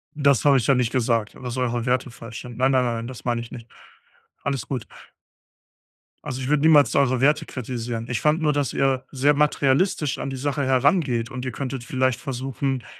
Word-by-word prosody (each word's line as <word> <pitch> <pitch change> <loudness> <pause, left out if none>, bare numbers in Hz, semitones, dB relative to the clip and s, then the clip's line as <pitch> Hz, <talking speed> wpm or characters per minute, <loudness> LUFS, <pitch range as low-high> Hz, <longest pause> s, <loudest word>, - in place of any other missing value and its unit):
Das 140 -4 +3
habe 140 -2 +6
ich 115 - -1
ja 140 - +5
nicht 125 -2 +1
gesagt, 115 -4 0
dass 125 0 -6
eure 120 -1 -1
Werte 125 0 0
falsch 115 0 -9
sind. 125 -1 -10
Nein, 130 +1 +3
nein, 130 -1 +3
nein, 120 -1 -1
nein, 115 +1 -5
das 125 -1 -9
meine 120 -1 0
ich 115 - -9
nicht. 115 -1 -10 0.7
Alles 135 -5 -2
gut. 130 -5 -4 1.4
Also, 130 0 -4
ich 130 - -4
würde 150 -1 +2
niemals 155 -3 +5
eure 130 -3 +2
Werte 150 +2 +3
kritisieren. 120 -2 -5
Ich 120 - -1
fand 155 +2 +2
nur, 150 -1 +3
dass 145 -2 -1
ihr 135 -1 +1
sehr 140 +2 +3
materialistisch 145 +1 +1
an - - -4
die 135 - -4
Sache 140 +2 -1
herangeht 130 -2 +2
und 130 0 -6
ihr 130 - -3
könntet 135 -2 -4
vielleicht 130 -1 0
versuchen, 135 -1 -3
130 Hz, 205 wpm, -23 LUFS, 120-140 Hz, 1.4 s, habe